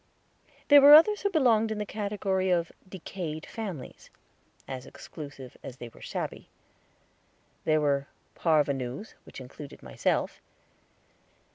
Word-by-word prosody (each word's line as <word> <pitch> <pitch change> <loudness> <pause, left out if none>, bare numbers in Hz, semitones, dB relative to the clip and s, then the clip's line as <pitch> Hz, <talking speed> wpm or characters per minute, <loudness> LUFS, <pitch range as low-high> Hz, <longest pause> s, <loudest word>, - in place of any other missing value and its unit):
There 290 -1 +9
were 290 +2 +11
others 415 +7 +6
who 405 - +1
belonged 240 - +3
in 220 - -3
the 210 - -3
category 200 -2 -2
of 170 -2 +1 0.2
Decayed 170 -4 -6
Families, 195 - -7 0.6
as 130 -1 -7
exclusive 140 -5 -10
as 130 - -9
they 120 -1 -8
were - - -18
shabby. - - -5 1.2
There 155 -1 +3
were 140 -1 +1 0.3
parvenus, 145 - 0
which - - -11
included 135 +2 -11
myself. - - -1
170 Hz, 120 wpm, -28 LUFS, 140-215 Hz, 1.2 s, were